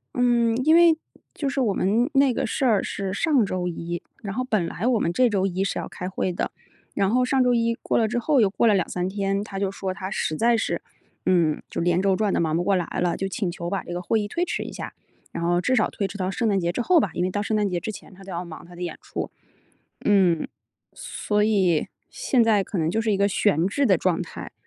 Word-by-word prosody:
嗯， 240 -2 +3
因 315 +1 +6
为 335 -2 +6 0.4
就 285 - -3
是 270 -1 -1
我 210 -5 +2
们 230 +10 +1
那 275 -2 +4
个 - - -1
事 260 +3 -1
儿 215 -5 +3
是 195 -1 -3
上 275 -2 +2
周 180 -1 -2
一， 170 0 -4 0.2
然 195 -2 -5
后 255 - -1
本 215 -9 0
来 210 - -4
我 245 -3 +3
们 170 - 0
这 250 +2 +4
周 195 -2 +1
一 190 0 -1
是 195 - -2
要 - - -5
开 180 - -6
会 185 -1 -2
的。 - - -2 0.4
然 195 -1 +1
后 250 +3 +3
上 260 +1 +2
周 250 -1 +3
一 230 0 +1
过 - - -1
了 225 - +3
之 240 +2 -1
后， 275 -1 +3
又 200 - +4
过 230 +4 +1
了 210 - +5
2-3 180 -1 -1
天， 195 0 -1
他 195 -2 -7
就 195 -1 -1
说 190 -1 -4
他 190 0 -6
实 155 - -1
在 235 +3 +3
是 - - -2 0.4
嗯， 170 -5 +2
就 - - -4
连 175 +1 +2
轴 195 -1 +2
转 210 -2 +1
得 - - +1
忙 160 0 +1
不 175 - 0
过 195 +1 +2
来 180 - 0
了， 175 -2 +1
就 195 - -2
请 190 -2 -2
求 170 0 -5
把 195 - -1
这 175 - -7
个 175 - -3
会 220 +4 +1
议 205 - -2
推 340 +11 -1
迟 - - -2
一 - - -8
下。 - - -6 0.4
然 - - -5
后 175 +1 +2
至 255 +5 +1
少 215 - +2
推 200 - -3
迟 205 - -8
到 185 -1 -1
圣 225 +3 0
诞 195 -1 +2
节 170 0 -1
之 245 - -1
后 345 +6 +4
吧， - - 0
因 175 - -1
为 185 - 0
到 205 - -1
圣 215 +1 -1
诞 205 -2 +1
节 175 -1 -1
之 220 - -5
前， 195 - -12
他 190 - -16
都 195 - -8
要 175 +1 -3
忙 170 -1 -10
他 175 0 -14
的 180 - -10
演 175 - -4
出， - - -5 0.7
嗯。 185 -6 +3 0.5
所 210 - -2
以， 190 -7 +2 0.2
现 265 - +2
在 210 -3 +3
可 195 - -6
能 160 -1 +1
就 225 - 0
是 220 -2 +1
一 - - +2
个 200 +1 +3
悬 190 -4 +2
置 275 +7 +1
的 190 -4 +5
状 175 0 0
态。 - - -7
200 Hz, 285 characters per minute, -24 LUFS, 180-230 Hz, 0.7 s, 因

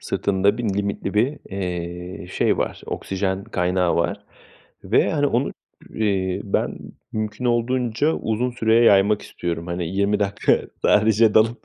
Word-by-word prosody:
sırtında 100 +2 0
bir 120 - -3
limitli 100 0 -2
bir, 130 +8 +1
eee, 90 -1 -5
şey 90 - 0
var, - - -2
oksijen 95 0 -3
kaynağı 90 -4 0
var 85 0 -1 0.6
ve, - - +2
hani, - - +2
onu - - 0 0.4
ü 110 - -2
eee, 95 -2 0
ben 100 - -1 0.3
mümkün 110 +2 -4
olduğunca 120 +3 +1
uzun 115 +3 -1
süreye 115 -1 +3
yaymak 100 0 +4
istiyorum. 85 -1 -5
Hani, 85 0 -3
20 100 +3 +1
dakika 100 0 +2 0.2
sadece 110 +1 +4
dalıp 115 +2 +3
100 Hz, 140 wpm, -22 LUFS, 95-110 Hz, 0.6 s, yaymak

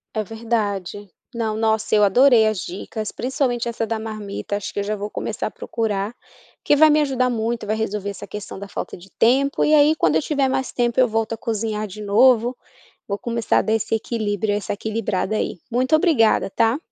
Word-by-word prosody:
É 215 - 0
verdade. 205 -3 -3 0.2
Não, 220 -2 -2
nossa, 220 -1 0
eu 210 - +5
adorei 230 +2 +5
as 215 -3 -1
dicas, 205 +5 -5
principalmente 250 -2 -1
essa 230 -1 -2
da 225 0 -3
marmita, 215 -2 -5
acho 205 - -5
que - - -3
eu - - -1
já 210 +1 -2
vou 205 0 -5
começar - - -3
a - - -7
procurar, 215 -1 -3 0.5
que - - +3
vai 310 +1 +7
me 305 0 +4
ajudar 260 -3 +1
muito, 230 -1 -2
vai 215 - 0
resolver 210 -2 -3
essa - - -9
questão 210 -1 -8
da 200 +1 -8
falta - - -5
de 185 +2 -15
tempo 270 +4 +3
e 305 - +3
aí 300 +1 +6
quando 155 - +2
eu 160 - +3
tiver 280 - 0
mais 265 0 -1
tempo 240 -1 0
eu 255 -1 +5
volto 225 +1 -1
a 225 - -4
cozinhar 215 -1 -2
de 210 +1 -9
novo, 235 +4 +4 0.5
vou 200 - -2
começar 235 +1 0
a - - +3
dar 220 - -2
esse 225 0 +1
equilíbrio, 215 -2 -2
essa 205 0 -2
equilibrada 215 -1 -2
aí, - - -2
muito 255 +5 +2
obrigada, 310 - +3
tá. 225 +5 +2
220 Hz, 205 wpm, -21 LUFS, 205-240 Hz, 0.5 s, vai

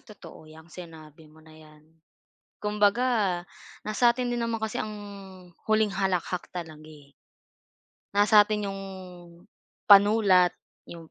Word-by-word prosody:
totoo 170 -7 -15
'yang 160 +2 -16
sinabi 160 -3 -13
mo 155 +1 -20
na 160 - -17
'yan. 155 -1 -18 0.8
Kumbaga 210 -2 +1 0.4
nasa 235 +3 +2
'tin 250 0 -3
din 240 - -2
naman 230 -1 -3
kasi 220 -1 -3
ang 215 0 -4 0.7
huling 215 -1 +2
halakhak 185 -2 -2
talaga, 160 -3 -8
eh. 150 -3 -16 1.1
Nasa 205 0 +5
'tin 210 -2 -3
yung 195 - -7 1.1
panulat, 200 -3 +6 0.3
yung 165 -2 -12
195 Hz, 120 wpm, -26 LUFS, 160-215 Hz, 1.1 s, panulat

